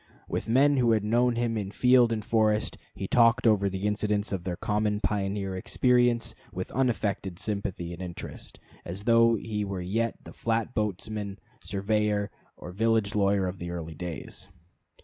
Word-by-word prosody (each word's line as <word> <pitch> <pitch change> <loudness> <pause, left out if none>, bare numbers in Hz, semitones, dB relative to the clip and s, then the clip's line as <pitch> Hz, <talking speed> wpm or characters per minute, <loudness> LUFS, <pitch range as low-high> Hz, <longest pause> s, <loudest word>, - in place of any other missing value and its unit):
With - - -3
men 140 +4 +4
who 120 -3 +4
had 110 -2 +1
known 120 +3 +2
him 115 -1 0
in 100 -2 -4
field 125 +2 +4
and 110 -2 -2
forest 110 -2 +2 0.2
he 95 - -4
talked 115 +1 +4
over 100 -3 +4
the 95 +1 -4
incidents 105 0 0
of 90 -2 -3
their 90 -2 -2
common 105 +2 0
pioneer 100 -2 -1
experience 120 +3 +2 0.2
with - - -5
unaffected 105 -7 -1
sympathy 95 -4 -3
and 85 - -8
interest, 90 -2 -7 0.2
as 90 +4 -6
though 115 0 +5
he 105 -1 -3
were 100 -2 -4
yet 110 +6 -1
the - - -11
flat 115 +1 -1
boatman, 105 -1 -3 0.3
surveyor, 105 +1 0 0.3
or 90 - -8
village 110 +1 +1
lawyer 100 -2 +2
of 90 0 -4
the 85 - -5
early 85 -2 -5
days. 90 +3 -6
105 Hz, 165 wpm, -28 LUFS, 95-115 Hz, 0.3 s, though